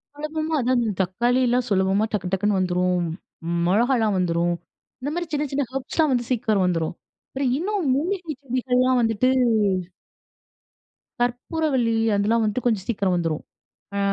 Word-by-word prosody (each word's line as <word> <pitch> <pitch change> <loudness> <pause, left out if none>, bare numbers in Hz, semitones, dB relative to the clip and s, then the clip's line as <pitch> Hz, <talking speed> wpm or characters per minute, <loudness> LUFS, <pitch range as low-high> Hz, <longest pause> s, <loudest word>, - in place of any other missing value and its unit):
சுலபமா 310 +2 -3
அதான், 255 +1 +2
அந்த 220 - 0
தக்காளிலாம் 245 +6 +1
சுலபமா 195 +2 +2
டக்கு, 190 -3 -1
டக்னு 200 +1 +1
வந்துரும். 180 -1 +1 0.6
மிளகாலாம் 220 +2 +2
வந்துரும், 175 -1 +1 0.5
இந்த 280 - -2
மாரி 345 0 -2
சின்ன 295 0 0
சின்ன 280 +1 +1
ஹெர்ப்ஸ் 270 +4 -5
லாம் 310 -3 +4
வந்து 245 -1 0
சீக்ரம் 220 -5 +1
வந்துரும். 170 -2 -1 0.3
அப்றம் 265 -2 -1
இன்னும் 385 0 -1
மூலிகை 340 +1 -2
செடிகள்லாம் 255 -1 +1
வந்துட்டு 225 +2 +2 1.9
கற்பூரவள்ளி 245 0 0 0.2
அதெல்லாம் 215 +3 +2
வந்துட்டு 215 +4 -1
கொஞ்சம் 215 -6 +1
சீக்கிரம் 195 -5 +1
வந்துரும். 165 -3 -1 0.5
அ - - 0
235 Hz, 130 wpm, -23 LUFS, 190-270 Hz, 1.9 s, லாம்